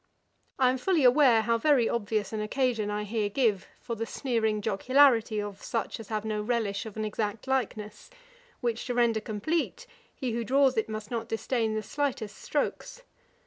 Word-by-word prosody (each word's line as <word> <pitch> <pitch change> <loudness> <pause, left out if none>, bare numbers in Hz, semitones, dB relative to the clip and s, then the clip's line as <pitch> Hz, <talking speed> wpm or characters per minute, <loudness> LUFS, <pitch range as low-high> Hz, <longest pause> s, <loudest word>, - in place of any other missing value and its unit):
I 255 -1 +4
am 260 - -3
fully 340 +1 +2
aware 250 -3 +6
how 230 0 +1
very 265 -3 +4
obvious 215 -2 -1
an 215 - -2
occasion 225 -1 0
I 210 0 -2
here 210 0 -1
give 210 -4 +1
for 235 - -5
the 225 0 -3
sneering 220 -5 0
jocularity 225 +1 +3
of 205 -1 -5
such 230 0 -3
as 225 - -9
have 215 -1 -3
no 215 -1 -1
relish 215 -2 -1
of 220 - -10
an 215 - -1
exact 210 0 -3
likeness; 230 -5 -3 0.5
which 235 -2 -2
to 245 - -2
render 235 -2 +2
complete, 305 - -2 0.3
he 255 -3 -3
who 235 +1 -2
draws 265 +2 +3
it 220 - 0
must 215 0 -6
not 230 -1 -3
disdain 225 -1 -1
the 215 - -2
slightest 240 -4 -3
strokes. 475 +11 -3
225 Hz, 180 wpm, -28 LUFS, 215-255 Hz, 0.5 s, aware